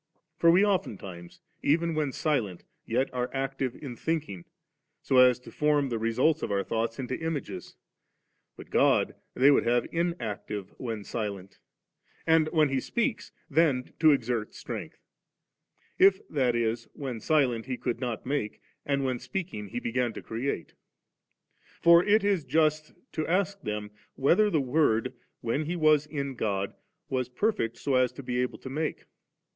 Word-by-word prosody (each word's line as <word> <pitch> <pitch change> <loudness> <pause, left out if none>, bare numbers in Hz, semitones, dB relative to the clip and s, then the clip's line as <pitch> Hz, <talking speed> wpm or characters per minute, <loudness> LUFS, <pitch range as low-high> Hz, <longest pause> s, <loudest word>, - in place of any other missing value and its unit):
For 170 - +6
we 185 +5 +6
oftentimes, 95 - -3 0.2
even 165 +3 +2
when 155 -2 0
sQent, 125 - -1 0.2
yet 125 +4 0
are 125 0 -1
active 135 -1 -2
in 135 -5 -7
thinking, 145 - -3 0.6
so 130 - +2
as 125 -1 +7
to - - -12
form 150 -2 +2
the 115 -2 -2
results 125 +8 +2
of - - -2
our 100 -1 0
thoughts 115 +1 -2
into 130 -1 -4
images; 140 - -4 0.8
but - - -12
God - - +3 0.2
they 135 +3 +6
would - - +4
have 120 +1 +2
inactive 115 - -3
when 115 -5 -4
silent, 100 -4 -5 0.7
and 160 -1 +4
when 155 -3 +3
He 135 -1 +1
speaks 235 - -2 0.2
then 140 -4 +2
to 155 -1 +7
exert 120 -5 -1
strength; - - -6 1.0
if, 190 0 +5
that 130 -5 +1
is, 115 0 -1
when 130 -5 -5
silent 125 -4 +1
He 130 -1 -2
could 120 -2 -2
not 120 -4 -3
make, 130 -6 -2 0.2
and 140 -1 0
when 130 -2 -1
speaking 125 - -5
He 110 - -4
began 120 0 -1
to - - -8
create. 120 +5 -3 1.1
For 170 +1 +7
it 210 +2 +4
is 200 -5 +2
just 155 +2 +1 0.2
to 155 - -2
ask 195 +3 0
them, 105 -1 -4 0.2
whether 180 +10 +4
the 155 -7 +2
Word, 130 -3 +2 0.3
when 125 +7 -1
He 170 +4 -2
was 155 -3 +4
in 140 -2 -3
God, 100 -5 -2 0.3
was 130 -2 -1
perfect, 125 - -1
so 140 - -2
as 130 -1 +3
to 140 - -9
be 125 0 -1
able 125 - -2
to 130 - -9
make. 155 +2 -2
130 Hz, 160 wpm, -28 LUFS, 115-155 Hz, 1.1 s, as